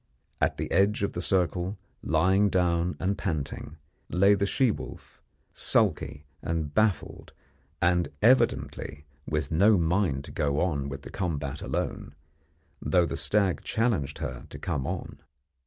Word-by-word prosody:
At - - +2
the - - -4
edge 100 +3 +3
of 100 - -1
the 85 - -3
circle, 90 +1 0 0.2
lying 95 +6 +3
down 90 -1 +1
and 95 +2 0
panting, 80 -9 -4 0.3
lay 100 +4 +5
the 100 0 +1
she 130 +2 +3
wolf, - - -9 0.3
sulky 70 +2 +1 0.2
and 80 -3 -2
baffled, 110 -1 0 0.5
and 90 0 +3
evidently 75 - +2 0.2
with 75 +1 -2
no 100 +6 +5
mind 85 -5 +1
to - - -9
go 75 -2 0
on 75 -6 0
with 70 0 -7
the - - -9
combat 75 -6 -3
alone, 70 - -3 0.7
though 90 -2 +3
the - - -3
stag 100 -4 +1
challenged 105 - 0
her 60 -1 -5
to - - -8
come 75 -7 -3
on. - - -5
85 Hz, 140 wpm, -28 LUFS, 75-100 Hz, 0.7 s, lay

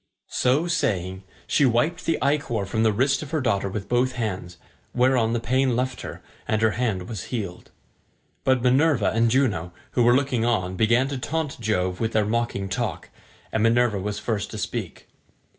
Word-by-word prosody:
So 135 +6 +2
saying, 95 - -1 0.2
she - - +2
wiped 140 +8 +1
the 165 - +2
ichor 140 -7 0
from 110 +3 -1
the 110 -1 +4
wrist 130 +6 +1
of 155 - -7
her 160 0 0
daughter 100 -7 0
with 100 +1 -5
both 125 +1 +1
hands, 95 -6 -4 0.4
whereon 125 -2 +3
the 120 - +1
pain 130 +2 +1
left 130 +1 -2
her, - - -8 0.2
and 110 - +1
her 110 - +4
hand 105 -7 -1
was 110 -6 -5
healed. 100 -8 -5 0.7
But 130 -2 +2
Minerva 130 -3 +3
and 115 +1 +2
Juno, 105 -10 +1 0.2
who 125 - +1
were 120 +1 +5
looking 130 -4 +1
on, 95 -6 0
began 115 +6 +3
to 140 -2 -3
taunt 155 +1 -3
Jove 90 -5 -1
with 115 0 -1
their 110 -1 +2
mocking 110 -3 -1
talk, 95 - -3 0.4
and 110 - 0
Minerva 115 -2 +3
was 105 +2 -3
first 105 -1 -2
to - - -7
speak. - - -5
115 Hz, 180 wpm, -24 LUFS, 105-130 Hz, 0.7 s, were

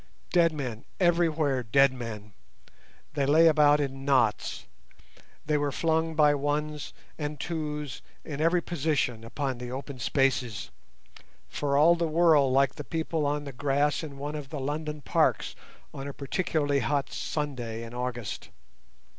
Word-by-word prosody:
Dead 170 -2 +4
men, 125 -7 -5 0.2
everywhere 165 -6 +2
dead 135 +4 +4
men—they 115 +4 -9
lay 160 +3 +6
about 150 -2 +5
in 135 -1 -3
knots, 130 -6 +1 0.8
they 150 -1 +1
were 145 -1 0
flung 160 +2 0
by 150 -1 +5
ones 145 +1 -2 0.3
and 150 -1 -4
twos 150 -4 -4 0.2
in 150 -2 -4
every 170 +2 +3
position 140 -8 -1
upon 130 +2 -3
the 125 0 -6
open 135 0 -6
spaces, 130 -4 0 0.8
for 140 -1 -1
all 160 +4 +7
the 170 -1 0
world 155 -4 +4
like 135 0 +3
the 150 - -7
people 160 -1 -1
on 145 0 -1
the 140 -2 -7
grass 145 +3 +1
in 145 -4 -8
one 145 +2 -4
of 145 -3 -6
the 150 - -5
London 150 +2 -3
parks - - +1 0.4
on 140 -1 -6
a 140 - -5
particularly 145 -1 0
hot 140 +3 -1
Sunday 120 -7 -4
in 115 0 -9
August. 120 -3 -4
145 Hz, 145 wpm, -28 LUFS, 135-155 Hz, 0.8 s, all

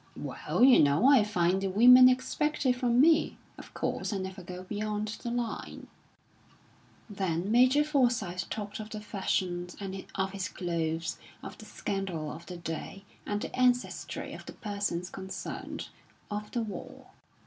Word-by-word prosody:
"Well, - - -1
you 260 -1 +8
know, 145 - +4
I 275 -6 +7
find 185 -2 +1
the 195 - 0
women 250 +6 +8
expect 290 +4 -1
it 255 - +5
from 245 -1 +1
me. 315 +3 +4 0.2
Of - - -12
course, - - -2
I 205 - -1
never 190 0 -5
go 180 +1 -8
beyond 210 +2 -3
the 240 - -4
line." 240 -1 -4 1.2
Then 190 -3 -2
Major 255 +5 +5
Forsyth 240 - 0
talked 205 -1 -5
of 215 0 -7
the 215 - -6
fashions, 180 -3 -2
and 195 -1 -5
of 190 0 -1
his 195 -1 -4
clothes, 165 -2 -2 0.2
of - - -9
the - - -10
scandal 180 -6 -4
of 165 +2 -10
the 180 - -7
day, 170 +3 -6 0.2
and 205 0 -1
the - - -5
ancestry 250 -1 0
of - - -10
the - - -7
persons 200 -4 -3
concerned, 190 0 -6 0.4
of 210 0 -4
the 240 -2 -2
war. 210 -3 -8
205 Hz, 160 wpm, -29 LUFS, 180-240 Hz, 1.2 s, you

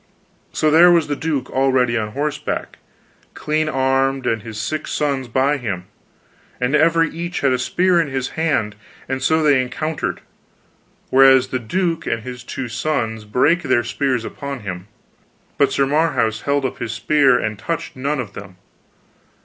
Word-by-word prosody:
So 155 - +1
there 170 +3 +7
was 170 -3 +4
the 145 - -2
duke 145 -4 -3
already 130 -3 +2
on 105 -2 -2
horseback, 145 +1 -3 0.6
clean 155 0 -1
armed, 135 -1 +1
and 115 -1 0
his 110 -1 -8
six 155 +9 -3
sons 140 -3 -1
by 135 +5 +1
him, 100 -9 -4 0.7
and 125 +4 +1
every 165 +2 +4
each 170 +2 -4
had 140 - +3
a 125 - +1
spear 175 +6 +2
in 160 - -2
his 135 -1 -3
hand, 145 -10 -1 0.3
and 130 0 -3
so 160 +4 +2
they 145 -4 +4
encountered, 150 +5 -3 0.9
whereas 130 -1 +6
the 130 - -2
duke 170 +8 -2
and 115 -1 -2
his 125 0 -8
two 130 +1 -5
sons 115 -3 -2
brake 140 +11 +2
their 130 -5 +1
spears 125 -1 -1
upon 140 -3 -6
him, 95 -2 -6 0.7
but 140 - +4
Sir 135 - +2
Marhaus 135 -7 +1
held 140 -1 +1
up 130 - -4
his 115 - -3
spear 135 +2 +3
and 110 -3 -3
touched 165 +8 -4
none 140 +3 -2
of 110 -6 -5
them. 100 -2 -10
135 Hz, 165 wpm, -20 LUFS, 120-150 Hz, 0.9 s, there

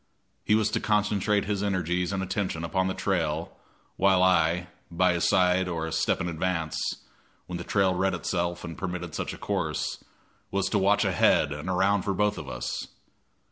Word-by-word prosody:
He 105 - +3
was 110 -1 +2
to - - 0
concentrate 105 -1 +1
his 100 -1 -1
energies 90 -2 0
and 95 -1 -1
attention 95 -3 -2
upon 95 +3 0
the 95 - -2
trail, 85 -4 -1 0.4
while 95 -1 +4
I, 90 -1 +3 0.2
by 90 +1 +2
his 85 0 +1
side 95 -1 +3
or 85 -2 -2
a 80 - -5
step 80 - +1
in 85 - -2
advance, 80 -1 -2 0.7
when 90 -1 -5
the - - -5
trail 95 0 +2
read 95 +1 +1
itself 85 +1 -2
and 85 -2 -6
permitted 90 -1 -5
such - - -3
a - - -8
course, - - -2 0.5
was 100 -1 0
to 105 - +1
watch 100 +2 +3
ahead 85 -5 +3
and 75 +4 -5
around 95 +2 +2
for 100 +1 -2
both 105 +1 +1
of 75 - -7
us. - - -4
90 Hz, 180 wpm, -27 LUFS, 85-100 Hz, 0.7 s, while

